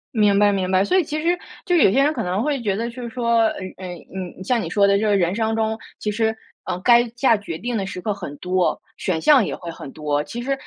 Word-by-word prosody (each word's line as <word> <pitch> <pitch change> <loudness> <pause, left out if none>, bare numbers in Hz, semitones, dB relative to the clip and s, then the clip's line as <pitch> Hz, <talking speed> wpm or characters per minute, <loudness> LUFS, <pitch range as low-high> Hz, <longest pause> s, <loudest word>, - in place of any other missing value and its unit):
明 210 -2 +4
白， 205 0 +5
明 190 -2 -1
白。 190 +1 +3
所 370 - +1
以 375 - +4
其 305 0 -3
实 350 +2 +1 0.3
就 355 - +2
有 295 - +5
些 270 - +3
人 295 +2 +2
可 230 -7 -3
能 185 +4 -1
会 285 -3 -1
觉 200 -4 0
得 230 +3 -2
就 245 +1 -9
是 235 - -5
说， 235 0 +1
呃， 225 -1 +4 0.3
呃， 185 -1 -7 0.3
嗯， 185 0 -6
像 235 +3 +1
你 - - -4
说 200 -1 +3
的 200 0 +4
这 220 - 0
个 205 -1 +3
人 175 -1 +1
生 225 -1 0
中， 220 0 0 0.2
其 210 - -2
实 220 +1 0 0.3
嗯， 180 -1 -3
该 240 0 +5
下 240 -2 +4
决 200 -6 -6
定 240 +7 -3
的 195 -3 -1
时 185 - -6
刻 210 +3 -2
很 145 -7 -7
多， 180 0 0 0.2
选 175 -4 -1
项 275 - +5
也 - - -3
会 170 -2 -7
很 140 - -9
多。 150 -1 -1
其 240 - -7
实 275 +2 0
215 Hz, 290 characters per minute, -22 LUFS, 185-240 Hz, 0.3 s, 白